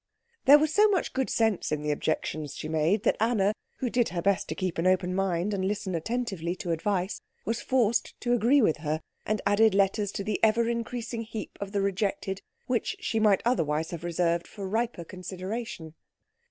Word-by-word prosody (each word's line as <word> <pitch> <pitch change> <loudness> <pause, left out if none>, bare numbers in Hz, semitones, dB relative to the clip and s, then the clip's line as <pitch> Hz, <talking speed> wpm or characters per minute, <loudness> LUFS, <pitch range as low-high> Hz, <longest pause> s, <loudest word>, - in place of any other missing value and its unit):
There 285 +2 +10
was 310 +1 +1
so 425 +1 +6
much 380 -4 0
good 265 -1 0
sense 220 -8 +1
in 150 -1 -1
the 150 - 0
objections 155 -1 -2
she - - -5
made 160 +7 +1
that - - +3
Anna, 215 -3 +2 0.2
who 255 - -2
did 240 -1 +2
her 170 0 -3
best 200 -1 +2
to - - -2
keep 185 -3 -2
an 170 - +2
open 185 -1 +2
mind 190 +1 0
and 190 -1 -1
listen 200 0 -2
attentively 190 -2 -2
to 180 -2 -4
advice, 185 +3 -1 0.2
was 230 +1 -1
forced 235 -3 +1
to 240 - +1
agree 245 +4 +4
with 160 - +3
her, 155 +1 -2 0.3
and 215 -1 0
added 205 0 +4
letters 200 +1 +2
to 200 - -3
the 210 +1 -2
ever 230 +1 +4
increasing 235 0 -3
heap 220 -1 -6
of 200 -1 -4
the 200 -1 0
rejected 195 0 -1 0.2
which 245 -2 -1
she 225 - -1
might 210 -3 +4
otherwise 160 -9 +1
have 170 -1 -6
reserved 170 0 0
for 200 -2 -7
riper 225 -2 -1
consideration. 185 0 -6
200 Hz, 195 wpm, -28 LUFS, 175-230 Hz, 0.3 s, There